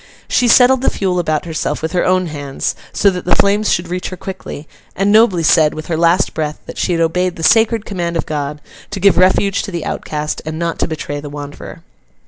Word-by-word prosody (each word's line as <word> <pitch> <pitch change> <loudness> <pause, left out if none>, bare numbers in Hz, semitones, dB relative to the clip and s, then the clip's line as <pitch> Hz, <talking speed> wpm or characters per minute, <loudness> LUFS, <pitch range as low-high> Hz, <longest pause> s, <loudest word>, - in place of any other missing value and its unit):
She 245 - +2
settled 250 +2 +5
the 265 - +2
fuel 185 -2 -1
about 155 -2 -1
herself 160 -1 -3
with 160 - -2
her 180 -1 +1
own 185 0 +2
hands, 145 -4 -3 0.2
so 200 - +3
that 180 -1 -5
the 180 - +2
flames 205 +2 +2
should 175 0 0
reach 180 +1 -4
her 185 - -8
quickly: 185 -6 -8 0.3
and 195 +2 +1
nobly 210 -6 +4
said, 155 -1 +4
with 155 0 -6
her 165 - 0
last 170 +3 +2
breath, 150 -1 -3
that - - -8
she 180 - 0
had 165 - 0
obeyed 180 +2 0
the 165 - -7
sacred 225 +5 +3
command 170 -4 -3
of 165 - -2
God, 150 -1 -4 0.3
to 200 - -5
give 195 +1 +4
refuge 190 +2 +3
to - - -6
the 170 -4 -4
outcast, 150 0 -4
and 155 0 -5
not 170 0 -3
to - - +1
betray 145 -2 -5
the 145 0 -8
wanderer. 145 0 -9
175 Hz, 225 wpm, -16 LUFS, 155-195 Hz, 0.3 s, settled